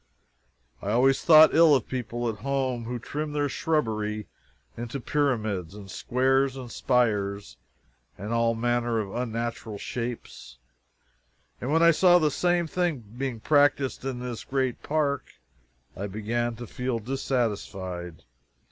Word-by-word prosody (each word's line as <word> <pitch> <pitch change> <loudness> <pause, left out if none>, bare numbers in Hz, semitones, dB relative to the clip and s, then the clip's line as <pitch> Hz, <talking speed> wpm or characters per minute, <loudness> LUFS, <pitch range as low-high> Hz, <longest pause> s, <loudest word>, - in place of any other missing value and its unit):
I 100 - -4
always 130 +5 +3
thought 155 -1 +8
ill 160 -2 +7
of 130 - -1
people 120 -2 -3
at 110 -2 -3
home 130 -1 -1
who 125 +1 -3
trimmed 150 +5 -5
their 145 -1 +1
shrubbery 110 -9 -1 0.5
into 120 +4 -5
pyramids 110 - -1
and 100 -2 -10
squares 135 +1 +1
and 125 -3 -8
spires 100 - 0 0.6
and 105 +4 -4
all 115 0 +2
manner 120 0 0
of 100 -3 -4
unnatural 115 -2 -3
shapes, 115 - -6 1.0
and 125 - -2
when 165 +2 +4
I 170 - +8
saw 175 +2 +5
the 155 -4 +2
same 175 +2 +1
thing 155 - -2
being 130 -3 -3
practiced 145 -2 +2
in 135 -2 -3
this 125 -2 -5
great 130 -2 -1
park 145 -2 -1 0.6
I 100 +2 -4
began 115 +4 -2
to 120 +2 -8
feel 125 +1 -3
dissatisfied. 105 -8 -3
120 Hz, 135 wpm, -26 LUFS, 110-140 Hz, 1.0 s, thought